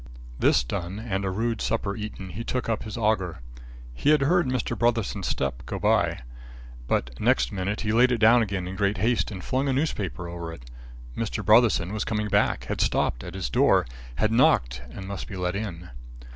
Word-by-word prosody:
This - - +4
done 90 +7 -4
and 100 -3 -3
a 95 - -1
rude 115 +3 -1
supper 100 -3 -1
eaten, 105 -3 -6
he 110 +7 -5
took 125 +1 -2
up 115 -2 -1
his 110 0 -6
auger. 105 - 0 0.5
He 100 - 0
had 150 -1 +5
heard 170 +4 +3
Mr. 130 -2 -1
Brotherson's 115 -3 0
step 70 -3 -2
go - - -3
by. - - +1 0.7
But 60 - 0
next 60 -1 +2
minute 100 +2 -2
he 105 -1 -1
laid 125 +3 +5
it 120 - +2
down 115 +2 +6
again 100 -4 -2
in 95 - -5
great 100 0 0
haste 115 +4 +1
and 95 -3 -7
flung 135 +2 0
a - - +2
newspaper 105 - -2
over 85 -1 -6
it. - - -12 0.5
Mr. 105 -2 -3
Brotherson 110 -4 +4
was 110 - -1
coming 105 -1 -2
back, - - +2
had - - -3
stopped - - 0
at - - -8
his 85 -10 -3
door, - - +4 0.3
had 110 +10 +1
knocked 65 - +3
and 95 +9 -8
must 100 -1 -5
be 100 - -7
let 90 0 -2
in. 90 -5 -5
105 Hz, 200 wpm, -26 LUFS, 90-115 Hz, 0.7 s, down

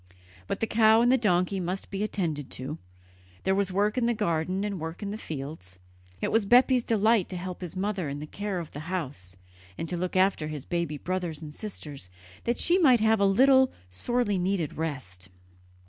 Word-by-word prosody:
Both - - -3
the - - +3
cow 220 0 +5
and 245 - +4
the - - +6
donkey 185 -2 +2
must 185 +2 -4
be 195 0 -3
attended 165 -9 -2
to; 140 +5 -6 0.6
there 190 - +2
was 195 -1 0
work 210 +5 +1
in 235 - +1
the 240 - +1
garden 185 -2 0
and 200 -3 -3
work 160 +5 -6
in 200 - -3
the - - -3
fields. 135 - -7 0.4
It - - 0
was 225 -1 +3
Bepi's 250 +2 +5
delight 220 -3 +2
to 185 - -5
help 180 +1 -6
his 180 0 -6
mother 190 -4 -2
in 140 - -4
the 150 - -6
care 200 +4 -4
of 170 -3 -5
the 145 - -7
house, 130 - -4 0.4
and 165 - -3
to 175 - -2
look 180 +1 -3
after 185 -4 +2
his 150 -3 -6
baby 170 -4 -2
brothers 175 -1 -3
and 150 -1 -8
sisters, 150 - -7 0.4
that 235 +1 +1
she 350 +2 +3
might 260 -9 +6
have 220 0 +3
a 200 - +4
little 260 +6 +5 0.2
sorely 205 - 0
needed 180 -4 -1
rest. 130 - -5
185 Hz, 200 wpm, -28 LUFS, 155-215 Hz, 0.6 s, the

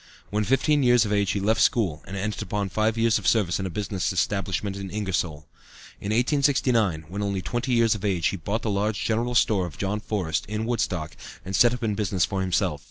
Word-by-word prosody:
When 105 +1 +1
fifteen 135 +6 +2
years 120 -3 +4
of 105 - -1
age 100 -2 +1
he 100 - 0
left 110 +3 +1
school, 90 -11 +2
and 100 - -6
entered 105 +2 -3
upon 100 -1 -2
five 110 +4 0
years 115 -1 +3
of 100 - -4
service 100 -6 +2
in 95 - -2
a - - -4
business 100 0 -2
establishment 95 +1 -1
in 100 -1 -6
Ingersoll. 90 -7 -2 0.5
In - - -11
1869, 120 - +2
when 100 +5 -5
only 100 -2 -2
twenty 120 +2 -2
years 115 -2 +4
of 105 - -6
age, 95 -6 +1
he - - -3
bought 105 +7 -3
the 110 - -1
large 105 +1 -1
general 120 +2 0
store 100 -5 +3
of 80 - -11
John 100 +2 -2
Forrest, 90 -7 -2
in 110 +2 -3
Woodstock, 90 -9 -2 0.3
and 95 +1 -3
set 120 +7 +6
up 120 - -8
in 110 -2 0
business 100 -4 0
for 95 -1 -3
himself. 90 -4 0
105 Hz, 220 wpm, -25 LUFS, 95-115 Hz, 0.5 s, set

